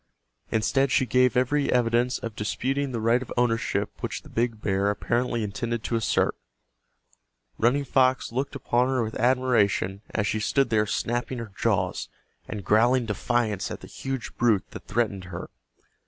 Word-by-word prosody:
Instead 135 +5 +2
she 130 - +3
gave 125 -1 +3
every 140 +3 +2
evidence 120 +1 +2
of 115 -3 -6
disputing 135 +6 -1
the 120 - -2
right 115 +3 +3
of 130 - -8
ownership 115 -4 0
which - - -4
the - - -14
big 115 -1 0
bear 100 -1 +1
apparently 120 +3 0
intended 115 +2 -3
to 115 - -1
assert. 115 - +1 1.2
Running 125 +5 +3
Fox 130 -2 +2
looked 135 +4 -2
upon 125 -2 +1
her 130 -2 +1
with 110 0 -4
admiration 120 -6 +2
as 105 - -1
she 110 - 0
stood 135 +3 +1
there 105 -1 +3
snapping 120 +4 -2
her 115 -3 -6
jaws, - - 0 0.4
and 105 -3 -6
growling 120 +4 +4
defiance 105 -1 -1
at - - -6
the - - -10
huge 135 -3 -5
brute 115 -5 +2
that - - -10
threatened 105 -5 -1
her. 90 -1 -7
120 Hz, 160 wpm, -26 LUFS, 110-125 Hz, 1.2 s, growling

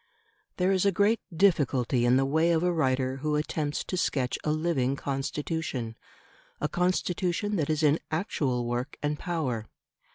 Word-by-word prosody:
There 185 +1 +2
is 190 -2 +2
a 200 - +4
great 205 +5 +3
difficulty 140 -9 +2
in 125 +1 +5
the 135 - +3
way 160 +5 +2
of 165 +1 +1
a 180 - +3
writer 130 -5 +1
who 150 +2 -1
attempts 150 -1 -1
to - - -4
sketch 135 -8 0
a - - -1
living 155 -5 +1
Constitution 135 -3 -3 0.6
a - - 0
Constitution 180 +2 0
that 155 -3 -1
is 155 0 +1
in 150 +1 +4
actual 140 - -1
work 120 +4 -3
and 150 0 -1
power. 130 -11 -2
150 Hz, 160 wpm, -28 LUFS, 130-175 Hz, 0.6 s, in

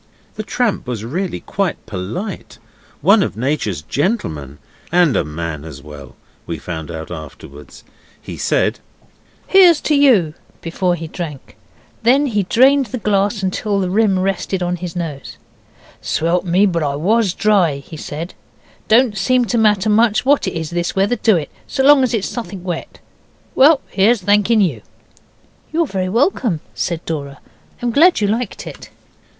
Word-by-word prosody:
The - - -5
tramp 220 - -1
was 115 -3 -4
really 175 +9 -3
quite 195 -3 -3
polite 110 - -6 0.4
one 200 +7 +5
of 110 - -2
Nature's 115 - -2
gentlemen, 80 - -2 0.3
and 175 -5 +3
a - - +2
man 75 0 -5
as 80 -4 -10
well, 75 -3 -11 0.3
we 85 - -4
found 80 0 -6
out 80 0 -7
afterwards. 75 -3 -11 0.4
He - - -9
said - - 0 0.7
'Here's 360 -5 +6
to 305 - 0
you!' 235 - +4 0.3
before 175 +2 -1
he 165 -1 -7
drank. 155 -5 -7 0.5
Then 265 +5 +4
he 215 -7 0
drained 260 +7 +3
the 235 - -5
glass 205 -1 0
till 205 0 -1
the 185 -2 -1
rim 205 -1 +2
rested 190 0 -1
on 180 0 -1
his 175 -1 -7
nose. 155 -6 -6 0.6
'Swelp 170 +3 0
me, 180 +3 +3
but 170 -4 0
I 140 -2 -1
WAS 195 +5 +1
dry,' 195 -8 +2
he 140 +4 -10
said. 155 +3 -6 0.5
'Don't 230 -1 +4
seem 250 +5 +2
to 230 +2 -1
matter 210 -2 +3
much 215 +1 +3
what 285 +1 +3
it - - -2
is, 160 -1 -5
this 175 0 -2
weather, 195 +5 +2
do 215 -5 +3
it? 150 -3 -5 0.2
so 265 - -1
long 285 0 +7
as 255 -2 +1
it's 200 -3 -2
suthink 195 -6 -6
wet. 175 -3 -5 0.6
Well, 285 +2 +5
here's 210 +3 +2
thanking 210 +3 +3
you.' 185 -5 0 0.9
'You're 330 +1 +1
very 185 -8 -3
welcome,' 230 - +1
said 170 -1 -3
Dora; 140 -3 -5 0.4
'I'm 240 - 0
glad 330 +9 +5
you 210 - +1
liked 225 +1 -3
it. - - -10
190 Hz, 160 wpm, -18 LUFS, 150-225 Hz, 0.9 s, long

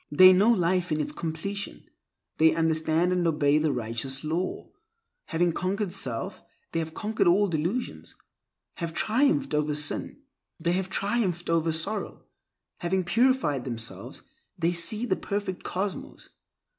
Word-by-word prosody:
They 185 +5 +9
know 200 +5 +4
life 180 -4 +2
in 155 - +1
its 150 - -1
completion; 200 +5 -5 0.6
they 160 0 +5
understand 160 +1 +1
and 180 -2 +1
obey 150 -2 +3
the 155 -1 +1
Righteous 125 +3 -3
Law. 165 +4 -3 0.5
Having 170 0 +1
conquered 190 +2 -1
self, 130 -11 -3 0.3
they 165 - -1
have 160 -1 -4
conquered 215 -2 0
all 200 +4 +4
delusions; 175 +9 -3 0.6
have 165 -1 -4
triumphed 275 - +2
over 150 0 +1
sin, 150 - -3 0.4
they 170 +1 +1
have 190 +1 -1
triumphed 195 -4 -1
over 165 0 +2
sorrow; 195 +7 -3 0.6
having 185 +1 0
purified 225 - +2
themselves, 115 -3 -6 0.3
they 170 0 +1
see 210 +7 +2
the - - +1
Perfect 200 -2 -3
Cosmos. 195 +2 -4
175 Hz, 135 wpm, -27 LUFS, 155-200 Hz, 0.6 s, They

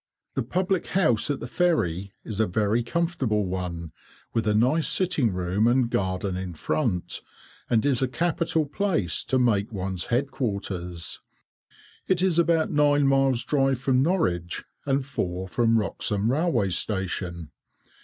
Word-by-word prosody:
The - - -1
public 185 - -1
house 150 - +2
at 145 - -2
the - - -4
ferry 110 - 0
is 110 -2 -5
a 110 - +3
very 105 +5 +1
comfortable 130 - 0
one, 90 -3 -4 0.4
with 115 -2 0
a 105 - +2
nice 130 +9 +3
sitting 165 - +2
room 90 +4 0
and 120 -1 +2
garden 95 0 -1
in 90 -2 -5
front, 100 - -1 0.5
and 115 0 +2
is 135 -3 +2
a 130 - +2
capital 160 +3 0
place 145 - -1
to 130 - +1
make 115 -3 +2
one's 95 -3 -2
head 130 +4 0
quarters. 95 -8 -3 0.9
It 185 -1 +2
is 180 -3 +3
about 165 -1 +2
nine 145 -1 +3
miles 135 -2 +3
drive 135 -3 +1
from 130 -1 +2
Norwich, 90 - 0 0.2
and 135 -1 +1
four 95 -9 -3
from 115 +3 +2
Wroxham 105 +1 0
railway 135 - +1
station. 90 -4 -2
120 Hz, 145 wpm, -25 LUFS, 95-145 Hz, 0.9 s, a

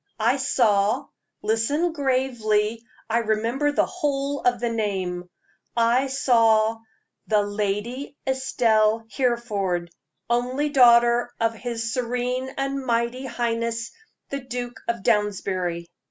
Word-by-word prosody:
"I 235 +5 +3
saw 220 -3 +2 0.4
listen 255 +11 +1
gravely 235 -6 0 0.2
I 230 +1 +2
remember 230 +6 0
the - - +2
whole 285 -5 -2
of 245 -1 +2
the 240 0 -1
name 190 -5 -2 0.5
I 235 +3 +3
saw 225 -4 +3 0.5
the 210 -1 +3
Lady 210 +7 -3
Estelle 225 -4 +2
Hereford, 205 -9 -1 0.4
only 250 +5 0
daughter 240 -3 +5
of 230 0 +1
his 230 0 -4
serene 250 +1 -2
and 275 0 -2
mighty 240 +1 -1
highness, 230 -1 -2 0.4
the 275 - -2
Duke 245 -2 -6
of 235 -4 -2
Downsbury." 190 -6 0
235 Hz, 110 wpm, -24 LUFS, 215-260 Hz, 0.5 s, daughter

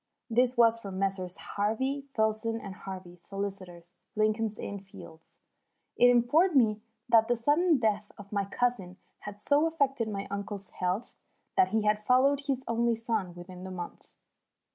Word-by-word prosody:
This 250 +2 +2
was 230 -1 +5
from 195 -4 -7
Messrs. 190 -1 -1
Harvey, 260 +7 -2
Filson, 220 +1 0
and 200 -3 -7
Harvey, 185 -2 -9
solicitors, 185 -2 -6 0.2
Lincoln's 215 0 +1
Inn 200 - -5
Fields. 165 -4 -14 0.6
It 245 +1 +6
informed 290 +9 +4
me 215 -5 +4 0.3
that 225 -2 +5
the 240 - +2
sudden 300 +7 +3
death 210 -3 0
of 200 -1 -12
my 200 -1 0
cousin 200 -4 -1 0.2
had 205 0 -9
so 290 +8 +3
affected 275 -7 0
my 200 -2 -4
uncle's 200 -1 -5
health 185 +6 -3 0.4
that 375 -1 +4
he 220 -1 +1
had 210 0 +2
followed 275 +5 +3
his 265 -2 -1
only 235 0 +1
son 220 -6 -2
within 180 +1 -10
the 190 - -6
month. 180 -2 -8
215 Hz, 155 wpm, -29 LUFS, 195-245 Hz, 0.6 s, It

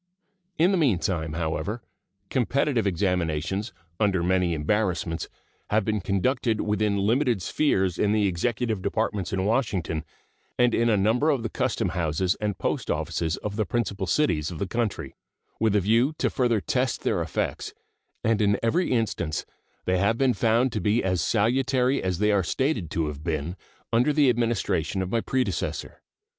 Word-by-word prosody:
In 175 +4 +4
the 190 - +2
meantime, 90 - 0
however, 80 +7 -3 0.5
competitive 130 -2 +1
examinations, 90 +1 -1 0.3
under 100 -5 +2
many 90 -1 +2
embarrassments, 85 0 -1 0.4
have 105 -1 +2
been 105 -2 0
conducted 110 +4 0
within 105 -1 0
limited 115 +3 +2
spheres 95 - +1
in 105 - +2
the 105 -1 +2
Executive 105 +3 -1
Departments 100 -1 -1
in 95 0 -1
Washington 100 - 0 0.5
and 125 -1 +3
in 115 0 +2
a 110 - +3
number 115 +10 +2
of 135 -6 +1
the 115 - -3
custom 130 -8 0
houses 85 +1 0
and 105 -2 -1
post - - -2
offices 80 +1 -1
of 105 0 -4
the 110 - +2
principal 105 -5 -2
cities 85 - +1
of 85 - -7
the 100 - -2
country, 115 +2 -2 0.5
with 110 -2 +2
a 105 - +4
view 115 - +2
to - - 0
further 120 -4 +2
test 125 +5 -1
their - - +1
effects, - - -3 0.5
and 110 -1 +2
in 100 -1 +3
every 170 +11 +1
instance 95 -10 -1 0.4
they 90 0 +1
have 100 +4 +2
been 130 -1 +3
found 115 +4 +2
to 110 - -2
be 105 +6 +2
as 95 -2 0
salutary 125 +4 +2
as 90 -2 -1
they 105 +2 +2
are 100 -1 +3
stated 110 - -1
to 80 0 -1
have 75 -1 -6
been 80 +1 -2 0.4
under 125 +6 +4
the 145 -2 +4
Administration 115 -6 0
of 95 - -5
my 115 - +1
predecessor. 125 -8 -2
105 Hz, 165 wpm, -26 LUFS, 90-120 Hz, 0.5 s, In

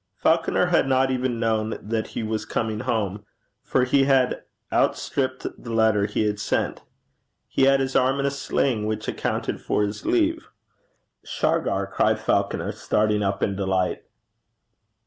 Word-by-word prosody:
Falconer - - +2
had - - +2
not 130 0 +2
even 125 -2 -1
known 110 -1 0
that 110 +1 -3
he - - -1
was 110 0 -2
coming 110 0 -2
home, 105 -4 -2 0.4
for 130 - +1
he 135 +2 +3
had 135 -2 +2 0.3
outstripped 130 -2 0
the 115 - -8
letter 110 -2 +3
he 105 +1 -1
had 105 0 -1
sent. - - -1 0.7
He 135 - +2
had 135 0 +5
his 135 0 -2
arm 130 +2 +3
in 140 - 0
a 140 - +1
sling, 130 -5 -1
which 110 0 -3
accounted - - -2
for 105 - 0
his 105 +1 -4
leave. 330 -1 +1 0.8
'Shargar!' - - 0
cried - - +1
Falconer, - - 0
starting 105 0 0
up 100 -1 -1
in 100 - 0
delight. 95 -2 0
115 Hz, 150 wpm, -24 LUFS, 105-135 Hz, 0.8 s, had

